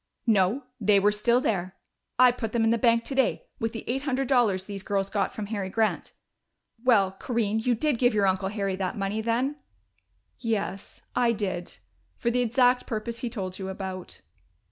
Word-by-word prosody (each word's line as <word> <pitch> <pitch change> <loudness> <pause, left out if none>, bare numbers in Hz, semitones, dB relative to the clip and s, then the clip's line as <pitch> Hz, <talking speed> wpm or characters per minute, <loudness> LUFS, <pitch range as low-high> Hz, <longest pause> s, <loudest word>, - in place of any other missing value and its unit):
"No, 220 +3 +2 0.2
they 205 -1 +4
were 205 +1 +4
still 235 +4 +3
there. 190 -6 -1 0.4
I 250 0 +7
put 225 -3 -5
them 235 -1 +2
in 225 - +3
the 230 - +2
bank 230 -1 +3
today, 270 - 0
with 225 -2 -1
the 225 - -6
eight 260 +3 -1
hundred 270 -1 -1
dollars 220 -8 +2
these 200 -1 -6
girls 195 0 -1
got 205 - 0
from 215 - -5
Harry 200 -2 -3
Grant.... 220 +2 0 0.7
Well, 210 -7 +4
Corinne, 225 -3 0
you 240 +2 +1
did 275 +1 0
give 245 -3 +3
your 205 -1 +3
uncle 190 0 +1
Harry 200 -2 -2
that 190 0 -2
money 200 +2 -1
then?" 245 +6 0 0.8
"Yes, 210 -4 -3
I 240 -1 +3
did. 190 -5 -4 0.4
For 235 - -1
the 250 +1 +1
exact 245 +1 +3
purpose 230 +1 -3
he 240 - -3
told 190 -5 -5
you 190 0 -4
about." 190 -1 -6
220 Hz, 185 wpm, -27 LUFS, 195-245 Hz, 0.8 s, I